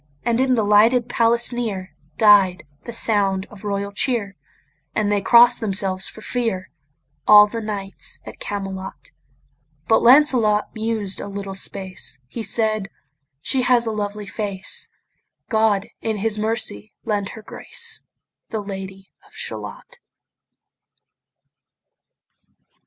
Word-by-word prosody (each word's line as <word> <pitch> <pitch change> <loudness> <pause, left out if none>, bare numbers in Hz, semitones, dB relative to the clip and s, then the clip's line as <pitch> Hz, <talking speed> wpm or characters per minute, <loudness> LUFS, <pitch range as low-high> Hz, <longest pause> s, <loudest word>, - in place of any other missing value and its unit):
And 235 0 0
in 260 -1 +3
the 225 - +1
lighted 225 +4 +4
palace 235 0 +2
near 205 -6 -4 0.2
Died 200 -4 +5 0.2
the - - -6
sound 200 -4 +2
of 210 -2 -14
royal 200 -1 -3
cheer; 205 -2 -1 0.6
And 210 -1 0
they 205 -1 +1
cross'd 240 +4 +6
themselves 195 -3 -1
for 220 - -10
fear, 225 -6 -3 0.6
All 210 0 +9
the 230 +2 -5
knights 200 -2 -4
at - - -11
Camelot: 195 - -6 0.8
But 225 - +4
Lancelot 240 -5 +4
mused 220 -3 -2
a - - -6
little 200 -1 -6
space; 190 -6 0
He 140 - -7
said, 215 -1 0 0.5
"She 265 - 0
has 245 -1 +3
a 225 - -1
lovely 210 -1 -4
face; 200 -1 -1 0.6
God 220 -3 +2 0.2
in 220 -1 -2
his 215 +1 0
mercy 215 - -2
lend 205 -2 -1
her 220 - -11
grace, 465 - -1 0.5
The 220 - -3
Lady 195 -1 -8 0.2
of - - -23
Shalott." - - -8
210 Hz, 125 wpm, -21 LUFS, 195-230 Hz, 0.8 s, All